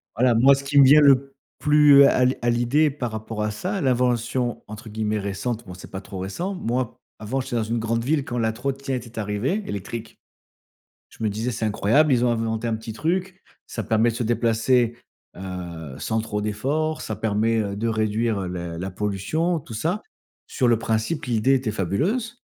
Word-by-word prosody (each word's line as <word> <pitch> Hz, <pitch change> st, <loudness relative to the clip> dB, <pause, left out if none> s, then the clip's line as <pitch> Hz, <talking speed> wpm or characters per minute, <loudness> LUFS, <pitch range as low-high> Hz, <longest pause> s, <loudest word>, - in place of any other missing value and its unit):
Voilà, 120 Hz, +1 st, +3 dB
moi, 135 Hz, +4 st, +6 dB
ce 140 Hz, -, -6 dB
qui 140 Hz, +1 st, -1 dB
me 140 Hz, -, +10 dB
vient 145 Hz, +3 st, +7 dB
le 135 Hz, -1 st, +4 dB, 0.3 s
plus 150 Hz, -1 st, +7 dB
à 130 Hz, -2 st, +4 dB
l 130 Hz, +1 st, +3 dB
à 120 Hz, -, +1 dB
l'idée 120 Hz, +6 st, +3 dB
par 130 Hz, -5 st, -4 dB
rapport 110 Hz, 0 st, -4 dB
à 105 Hz, -, -1 dB
ça, 185 Hz, -, -3 dB
l'invention 125 Hz, -2 st, 0 dB
entre 110 Hz, +1 st, -9 dB
guillemets 110 Hz, 0 st, -1 dB
«récente», 100 Hz, +4 st, -3 dB
bon, 90 Hz, -, -8 dB
c'est 90 Hz, -, -12 dB
pas 95 Hz, -, -5 dB
trop 95 Hz, -, -9 dB
récent. 135 Hz, -, -3 dB
Moi, 125 Hz, -5 st, -2 dB, 0.2 s
avant, 110 Hz, +5 st, -2 dB
j'étais 130 Hz, -1 st, -4 dB
dans 115 Hz, -, +1 dB
une 115 Hz, +2 st, -2 dB
grande 115 Hz, +1 st, -1 dB
ville 145 Hz, +1 st, 0 dB
quand 120 Hz, -, -4 dB
la 110 Hz, -1 st, +1 dB
trottinette 130 Hz, +1 st, -3 dB
était 115 Hz, -1 st, -8 dB
arrivée, 105 Hz, -, -1 dB
électrique. 110 Hz, +3 st, -6 dB, 0.9 s
Je -, -, -12 dB
me -, -, +2 dB
disais: 110 Hz, +4 st, -2 dB
«C'est 115 Hz, -1 st, -3 dB
incroyable, 115 Hz, +8 st, +3 dB
ils 125 Hz, 0 st, +3 dB
ont 120 Hz, -, +3 dB
inventé 115 Hz, 0 st, -1 dB
un 115 Hz, -, 0 dB
petit 110 Hz, 0 st, -7 dB
truc, 185 Hz, -, -2 dB, 0.2 s
ça -, -, -5 dB
permet 110 Hz, +1 st, +2 dB
de -, -, -7 dB
se 120 Hz, -, -2 dB
déplacer, 120 Hz, +1 st, +2 dB, 0.4 s
heu, 85 Hz, -6 st, -7 dB
sans 110 Hz, 0 st, -1 dB
trop 105 Hz, -2 st, -3 dB
d'efforts, 140 Hz, +10 st, -1 dB
ça 110 Hz, -, -4 dB
permet, 110 Hz, +1 st, +1 dB
heu, 100 Hz, -2 st, -2 dB
de 115 Hz, +3 st, -1 dB
réduire, 110 Hz, 0 st, 0 dB
heu, 95 Hz, -, -3 dB
la 85 Hz, -2 st, -5 dB
la 95 Hz, +2 st, -4 dB
pollution, 105 Hz, -, -1 dB
tout 115 Hz, -, -10 dB
ça». 170 Hz, -, -1 dB, 0.4 s
Sur 125 Hz, -4 st, 0 dB
le 115 Hz, -2 st, +4 dB
principe, 115 Hz, +8 st, -1 dB
l'idée 120 Hz, +2 st, +2 dB
était 130 Hz, -4 st, 0 dB
fabuleuse. 200 Hz, -, -1 dB
115 Hz, 200 wpm, -23 LUFS, 110-135 Hz, 0.9 s, me